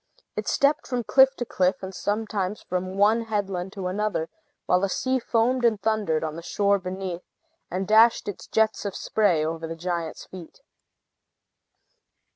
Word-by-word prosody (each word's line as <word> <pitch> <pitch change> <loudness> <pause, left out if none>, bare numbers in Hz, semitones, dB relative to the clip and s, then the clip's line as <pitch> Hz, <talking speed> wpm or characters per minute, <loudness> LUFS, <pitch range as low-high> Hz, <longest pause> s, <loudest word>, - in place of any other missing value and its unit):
It - - -4
stepped 280 +2 +2
from 250 -2 -2
cliff 265 +3 +5
to 245 - -4
cliff, 185 -2 0
and 190 0 -6
sometimes 205 -1 -2
from 185 +1 -3
one 220 +3 +3
headland 195 -4 -2
to 195 -3 -6
another, 195 -3 -1 0.4
while 180 - +3
the 195 +1 0
sea 260 +6 0
foamed 240 +2 +1
and 225 -3 +3
thundered 210 -8 0
on 155 -1 -3
the 165 - -7
shore 200 +3 +1
beneath, 185 -1 -5 0.5
and 185 +1 -3
dashed 225 +2 +5
its 205 - -6
jets 220 0 +1
of 200 -2 -4
spray 180 -8 +1
over 165 +1 -3
the 165 - -5
giant's 170 -1 -4
feet. 185 - -12
200 Hz, 160 wpm, -25 LUFS, 180-220 Hz, 0.5 s, cliff